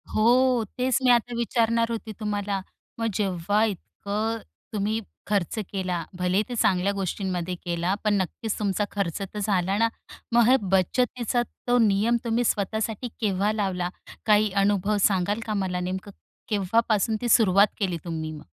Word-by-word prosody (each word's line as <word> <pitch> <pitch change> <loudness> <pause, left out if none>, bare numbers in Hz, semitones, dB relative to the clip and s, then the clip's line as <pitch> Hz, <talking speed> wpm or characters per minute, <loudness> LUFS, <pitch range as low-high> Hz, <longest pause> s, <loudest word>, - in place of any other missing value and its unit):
हो, 245 +2 +4
तेच 255 -1 +2
मी 250 - +4
आता 240 0 +2
विचारणार 230 0 +1
होती 225 -1 -4
तुम्हाला. 205 -2 -2 0.4
मग 230 - 0
जेव्हा 200 +1 +1
इतकं 215 +2 -3 0.4
तुम्ही 215 +2 0 0.3
खर्च 200 0 0
केला, 185 -4 -3
भलेही 180 +3 +1
ते 245 - -3
चांगल्या 195 -3 +2
गोष्टींमध्ये 185 -2 -2
केला, 175 +2 0
पण 210 - +2
नक्कीच 210 +4 -4
तुमचा 205 0 0
खर्च 195 -2 -2
तर 200 +2 -5
झाला 195 -1 +1
ना. 230 +1 +3 0.4
मग 235 -1 +5
हे 255 - +7
बचतीचा 235 +6 +1 0.3
तो 245 0 +4
नियम 210 +4 +2
तुम्ही 235 +1 +1
स्वतःसाठी 220 +2 -1
केव्हा 200 0 +1
लावला? 190 -4 -1 0.4
काही 210 -1 +4
अनुभव 205 +1 +1
सांगाल 200 +1 0
का 215 - -2
मला 190 -3 -1
नेमकं 185 +3 -4 0.4
केव्हापासून 215 +1 +1
ती 240 - -1
सुरुवात 200 -3 +6
केली 185 -4 0
तुम्ही 160 -2 -4
मग? 150 -9 -10
205 Hz, 150 wpm, -25 LUFS, 190-225 Hz, 0.4 s, हे